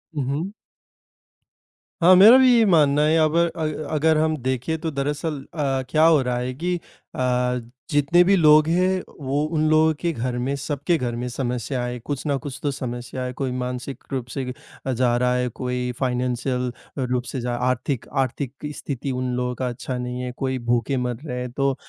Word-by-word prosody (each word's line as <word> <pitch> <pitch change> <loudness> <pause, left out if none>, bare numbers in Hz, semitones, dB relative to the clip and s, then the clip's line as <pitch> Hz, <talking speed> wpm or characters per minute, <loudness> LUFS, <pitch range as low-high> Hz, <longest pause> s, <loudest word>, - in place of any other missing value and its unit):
हुँ, 140 - -1
हुँ। 160 +8 -2 1.5
हाँ, 185 +1 +8
मेरा 220 +7 +9
भी 260 -1 +6
ये 225 - +5
मानना 150 -5 +4
है। 160 +1 +3
अबर 165 +2 +3
अग 155 -1 -1 0.2
अगर 155 +1 +3
हम 155 0 +2
देखें, 130 +5 -1
तो 160 -2 -2
दरअसल 145 +2 -2
अ, 135 -4 0
क्या 155 0 +3
हो 160 -4 +5
रहा 125 -1 -1
है 125 +1 -3
कि 175 +6 -2
अ, - - -12 1.1
जितने 150 +5 +4
भी 195 +2 +4
लोग 155 -2 +6
हैं, 185 +2 +2 0.2
वो 140 +2 -1
उन 155 0 +2
लोगों 155 0 +4
के 170 -1 0
घर 125 0 -3
में, 135 +3 -1
सबके 145 +4 -1
घर 120 -3 -2
में 125 +1 -3
समस्या 125 0 -2
है, 125 0 -4
कुछ 140 +4 -5
ना 140 -1 +1
कुछ 135 - -6
तो 145 - +1
समस्या 120 0 -5
है, 125 0 -4
कोई 130 -1 -3
मानसिक 125 +1 -4
रूप 130 -3 -2
से 135 -2 -2 0.4
अ, 130 - 0
जा 120 0 +2
रहा 125 0 +2
है, 125 0 0
कोई 125 +1 -3
फाइनेंशियल 125 0 -1 0.3
रूप 125 -1 0
से 130 - -2
जा 120 0 -2
आर्थिक 130 0 -2 0.2
आर्थिक 130 +1 -4 0.2
स्थिति 135 -1 -4
उन 125 0 -2
लोगों 125 0 -2
का 130 0 -2
अच्छा 125 +1 -5
नहीं 125 0 -4
है, 125 0 -4
कोई 130 -1 -1
भूखे 120 +3 +1
मर 120 - -2
रहे 125 -3 -4
हैं। 125 -1 -5
तो 135 0 0
135 Hz, 195 wpm, -23 LUFS, 125-155 Hz, 1.5 s, मेरा